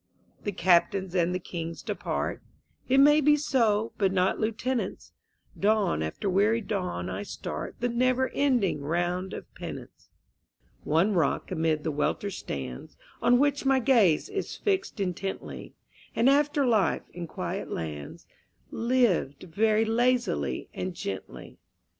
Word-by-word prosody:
_ - - -27
The 205 - 0
Captains 185 +1 +2
and 175 -1 +2
the 180 - 0
Kings 170 -2 -6
depart - - -3 0.5
It 265 - +4
may 295 +2 +7
be 295 +1 +5
so, 230 -7 +1
but 195 -2 +3
not 185 0 +1
lieutenants; 225 0 -2 0.5
Dawn 205 - +2
after 80 - -3
weary 205 +4 +3
dawn 180 - -3
I 95 +1 -4
start 105 - -6
The 245 - +2
never 255 +2 +1
ending 245 - +1
round 175 +5 -1
of - - -7
penance; - - -9 0.7
One 170 +8 +2
rock 170 -1 0
amid 160 -3 0
the 160 - -1
welter 200 +7 -1
stands 65 - -6 0.2
On 245 0 +5
which 285 +1 +2
my 270 -1 +4
gaze 230 - +3
is 405 -1 -4
fixed 385 - -1
intently 195 0 -4 0.4
An 230 - +3
after 290 0 +3
life 220 -5 +2
in 175 -1 -6
quiet 185 +2 -4
lands 75 -3 -6 0.5
Lived 230 - +1
very 215 +5 +2
lazily 240 -3 0
and 185 -1 -4
gently. 95 - -7
200 Hz, 135 wpm, -27 LUFS, 170-245 Hz, 0.7 s, may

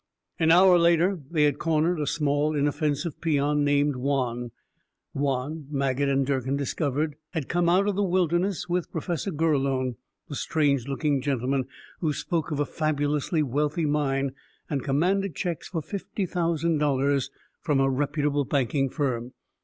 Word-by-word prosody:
An 160 - +3
hour 180 +1 +7
later, 170 +2 +3
they 155 -3 +2
had 145 -1 +2
cornered 165 +1 +1
a 150 - -1
small, 150 0 +1
inoffensive 145 +2 -1
peon 150 -2 +1
named 145 0 +2
Juan. 125 -3 -1 0.6
Juan, 140 +2 -2
Maget 140 -1 0
and 135 0 +2
Durkin 130 -1 -1
had - - +1
discovered, 145 +1 -1 0.2
had 160 -6 -3
come 175 0 +1
out 190 +3 +3
of 205 - 0
the 205 - 0
wilderness 180 0 +1
with 175 -1 -1
Professor 170 +4 -3
Gurlone, 135 - 0 0.3
the - - -7
strange 140 -3 0
looking 140 0 0
gentleman 130 -1 -1 0.3
who 155 -3 0
spoke 165 +1 -2
of 150 - -2
a 145 - +2
fabulously 150 +1 0
wealthy 150 +4 0
mine 140 -2 0 0.4
and 140 -3 -1
commanded 180 +5 +1
checks 170 +1 -3
for 165 -4 -4
fifty 200 +1 -4
thousand 170 -2 0
dollars 140 -1 +1 0.3
from 145 -3 +1
a 135 - +3
reputable 145 +1 0
banking 135 0 0
firm. 125 -4 -2
145 Hz, 155 wpm, -26 LUFS, 140-165 Hz, 0.6 s, hour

